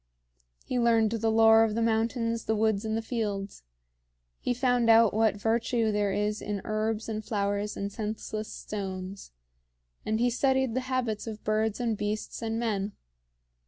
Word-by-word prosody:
He 250 - -1
learned 230 -2 +3
the 225 -1 0
lore 225 0 +6
of 215 -1 0
the 230 - 0
mountains, 230 0 0
the 220 - +1
woods, 220 -1 +1
and 220 0 -1
the 225 - -3
fields. 205 -4 -3 0.8
He - - -2
found 245 -1 +2
out 225 -1 +6
what 220 -1 +3
virtue 225 +1 +1
there 205 -1 +1
is 210 +1 -1
in 205 -1 -3
herbs 215 +1 -1
and 215 -1 -3
flowers 205 -1 -1
and 200 0 -3
senseless 215 0 -4
stones; 190 -1 -6 0.7
and 220 +1 -1
he 245 +1 +2
studied 265 0 +1
the 255 - +1
habits 240 -5 -1
of 220 -1 -7
birds 215 0 0
and 235 -2 0
beasts 210 +3 -3
and 225 0 -2
men. 210 -3 -1
220 Hz, 160 wpm, -28 LUFS, 210-230 Hz, 0.8 s, lore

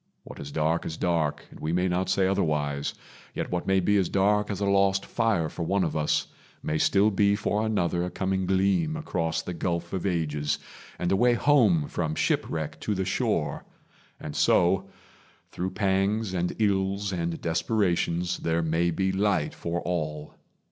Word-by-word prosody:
What - - -11
is 70 - -7
dark 80 +2 0
Is 80 - -5
dark, 85 -4 0
and - - -13
we 80 - -2
may 90 +2 +1
not 90 +1 0
say 95 - +2
otherwise; 75 -7 0 0.4
Yet - - -3
what 90 -1 -2
may 95 0 +3
be 105 +3 +2
as 95 -3 +1
dark 105 +2 +2
as 100 -2 -3
a 100 - 0
lost 100 0 +2
fire 110 -9 +1
For 85 - -7
one 95 +3 +1
of 80 - -2
us, 75 -1 +1 0.4
may 75 0 -1
still 100 +6 +4
be 100 +1 +3
for 105 +1 0
another 90 -5 0
A 90 - -2
coming 95 0 -1
gleam 100 - +2
across 85 - -2
the 90 - -5
gulf 85 0 -3
of 95 0 -1
ages, 75 -5 -1 0.4
And 90 - -1
a - - +4
way 120 +4 +4
home 110 - +3
from 80 -3 -2
shipwreck 80 0 -1
to 105 - -2
the 95 0 -1
shore; 95 - -1 0.6
And 75 - -7
so, 95 +2 +3 0.6
through 90 +1 -3
pangs 100 +1 0
and 90 -1 -1
ills 100 -1 0
and 85 -2 -2
desperations, 85 -1 0
There 85 0 0
may 80 +2 +1
be 95 +3 0
light 100 0 +1
for 85 +1 -3
all. 75 -4 -3
90 Hz, 175 wpm, -27 LUFS, 85-100 Hz, 0.6 s, still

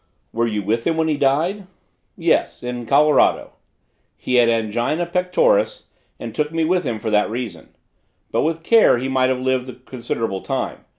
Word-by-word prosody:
"Were 115 +1 0
you 105 -2 -2
with 115 +4 -1
him 165 -1 0
when 160 0 +1
he 155 - +1
died?" 160 +9 0 0.5
"Yes - - 0
in 125 -1 -5
Colorado. 150 +3 +3 0.6
He 125 - -1
had 120 -1 +5
angina 115 +8 0
pectoris - - +1 0.3
and - - -7
took 150 0 -1
me 165 0 -1
with 180 0 +1
him 115 -4 -2
for 110 +1 -3
that 105 0 +2
reason. 120 +1 -7 0.6
But - - +1
with 165 +1 -2
care 225 - +5
he 130 +2 -3
might 130 -1 +1
have 130 -1 0
lived 130 0 -1
a - - -8
considerable 115 -5 -4
time. - - -4
130 Hz, 175 wpm, -20 LUFS, 115-165 Hz, 0.6 s, had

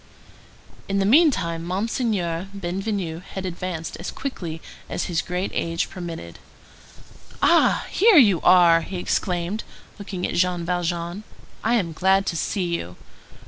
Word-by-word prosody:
In 195 - 0
the 195 - +2
meantime, 195 - +3
Monseigneur 185 -2 -1
Bienvenu 185 -2 -3
had 190 0 -7
advanced 175 -2 -5
as 175 - -5
quickly 175 -12 -5 0.3
as - - -2
his 170 -3 -1
great 180 +2 -3
age 165 0 -1
permitted. 165 - -7 1.0
"Ah! - - +4
here 425 -1 +5
you 205 - +6
are!" 170 -2 +6
he 185 +3 -6
exclaimed, 180 +3 -1 0.4
looking 190 -3 -4
at - - -3
Jean 175 -1 +1
Valjean. 175 +2 -2 0.4
"I 235 +2 +2
am 175 -8 0
glad 190 +3 +3
to 175 - -2
see 190 +4 -1
you. 170 - -3
180 Hz, 135 wpm, -23 LUFS, 170-195 Hz, 1.0 s, you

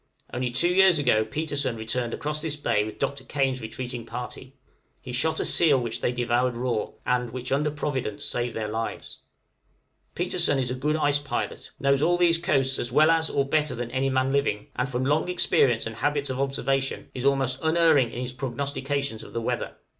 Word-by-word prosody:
Only 125 0 -1
two 175 +9 +1
years 190 -2 +6
ago 125 -7 +3
Petersen 145 +1 -1
returned 115 +2 -2
across 150 +3 -2
this 155 -2 -1
bay 125 -8 +1
with 110 0 -7
Dr. 140 -1 -2
Kane's 135 -3 -1
retreating 120 +2 -5
party; 125 +3 -7 0.4
he 125 - -8
shot 150 +6 0
a - - 0
seal 150 -6 +4
which 120 -2 -4
they - - +1
devoured 120 0 0
raw, 120 -3 -1 0.2
and 125 -1 +1
which 125 +2 -6
under 145 +3 +2
Providence, 135 -8 -3
saved 120 -1 -2
their 110 -1 -2
lives. 115 +1 -4 1.0
Petersen 140 - +1
is 125 -2 -1
a - - 0
good 145 +4 0
ice 145 -2 +2
pilot, 145 - -4
knows 140 0 +2
all 175 +3 +3
these 170 -1 +4
coasts 135 -6 +1
as 120 - -3
well 155 +5 +5
as 160 -1 +2
or 140 - +1
better 150 -1 +1
than 120 0 -5
any 130 +1 0
man 130 0 +1
living, 140 -7 0
and, 125 +2 -1
from 130 0 -1
long 150 +5 +1
experience 130 -9 +2
and 115 -1 -6
habits 145 +2 0
of 130 - -4
observation, 135 0 -1
is 125 - -5
almost 135 -2 +2
unerring 160 -6 +4
in 120 - -5
his 125 0 -5
prognostications 140 -1 -2
of - - -12
the 115 - -1
weather. - - -2
135 Hz, 195 wpm, -26 LUFS, 120-145 Hz, 1.0 s, years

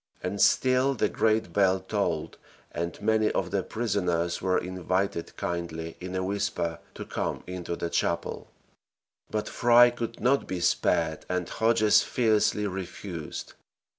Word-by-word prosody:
And 95 +3 -2
still 130 +1 +4
the - - +1
great 110 -5 +1
bell 95 -2 +3
tolled, - - -2 0.3
and 85 0 -4
many 110 0 +3
of 90 -2 -1
the 100 -1 +1
prisoners 90 -7 -1
were 95 -1 +2
invited 95 0 -2
kindly 85 -1 -4
in 90 +1 -6
a 95 - 0
whisper 95 -4 -2 0.2
to - - -6
come - - -3
into 90 -2 -4
the 85 0 -4
chapel; 85 - -1 0.8
but 105 -1 -2
Fry 120 0 +6
could 115 -1 -5
not 135 +3 +2
be 95 - -3
spared 85 -2 +1
and 90 -1 -1
Hodges 110 -2 +4
fiercely 110 -3 +2
refused. 90 -3 -6
95 Hz, 135 wpm, -27 LUFS, 85-110 Hz, 0.8 s, Fry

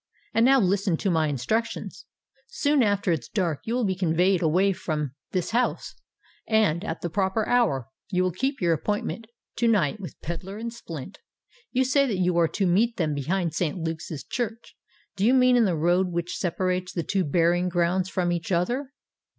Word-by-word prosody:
"And 230 +2 +4
now 270 0 +6
listen 195 -3 +1
to 195 - 0
my 160 -2 +2
instructions. 150 - -3 0.4
Soon 290 0 +1
after 200 -4 +2
it 165 - +1
is 120 - -13
dark 175 -8 -1
you 230 - -1
will 250 -2 +1
be 190 - +1
conveyed 180 +1 +2
away 180 +5 +3
from 150 -6 -3 0.2
this 180 -3 -2
house; 245 +2 0 0.5
and, 210 -6 +2
at - - -4
the 175 - -2
proper 195 +3 0
hour, 145 - +2 0.2
you 185 -2 +1
will 185 - +1
keep 265 - -2
your 170 -3 +2
appointment 210 +6 -3 0.3
to 235 - +2
night 205 -5 +2
with 185 - -9
Pedler 180 +5 -5
and 230 +1 -5
Splint. 170 - -8 0.5
You 260 0 +2
say 275 +2 +3
that 210 -6 -1
you 180 -1 +1
are 165 - +4
to 195 +4 -1
meet 215 +7 +2
them 155 -4 0
behind 165 +4 -1
St. 160 +1 -1
Luke's 165 -1 -4
church. 230 -1 -5 0.4
Do 195 - -2
you 245 +5 +5
mean 255 -1 +5
in 240 -2 +5
the 180 -5 0
road 175 +4 +2
which 175 +1 -3
separates 185 0 -1
the 170 - -2
two 195 +3 0
burying 175 +3 +2
grounds 180 +1 +1
from 180 -2 0
each 170 +1 -3
other?" 245 +10 -1
185 Hz, 190 wpm, -25 LUFS, 170-220 Hz, 0.5 s, now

